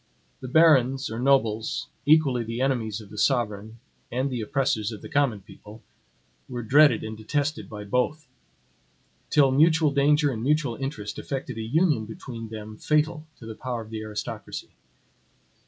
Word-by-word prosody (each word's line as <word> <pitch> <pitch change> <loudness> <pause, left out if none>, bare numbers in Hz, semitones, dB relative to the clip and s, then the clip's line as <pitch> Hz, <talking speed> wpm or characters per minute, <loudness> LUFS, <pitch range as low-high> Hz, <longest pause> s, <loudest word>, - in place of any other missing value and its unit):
The 130 - -7
barons, 135 -3 +4
or 110 - -4
nobles, 115 -5 +1 0.2
equally 145 -6 +4
the 115 +1 -5
enemies 115 -5 -1
of 105 - -14
the - - -7
sovereign 110 -4 0 0.3
and 130 +3 -1
the 125 -2 -2
oppressors 120 -4 0
of 110 - -9
the - - -8
common 140 -9 +1
people, 105 +2 -14 0.7
were 120 -2 -4
dreaded 140 0 +5
and 110 0 -5
detested 145 +7 -2
by 105 -2 -7
both; 125 +8 -1 1.0
till 140 -3 +4
mutual 155 +2 +4
danger 145 +1 +3
and 110 -3 -4
mutual 140 -2 +1
interest 135 -7 -5
effected 130 -4 -5
a - - -2
union 145 0 +1
between 115 0 -8
them 110 -1 -8
fatal 155 +3 0
to 115 - -12
the 110 - -6
power 120 +1 -4
of 110 - -15
the 110 -1 -4
aristocracy. 105 -1 -6
125 Hz, 155 wpm, -25 LUFS, 110-145 Hz, 1.0 s, dreaded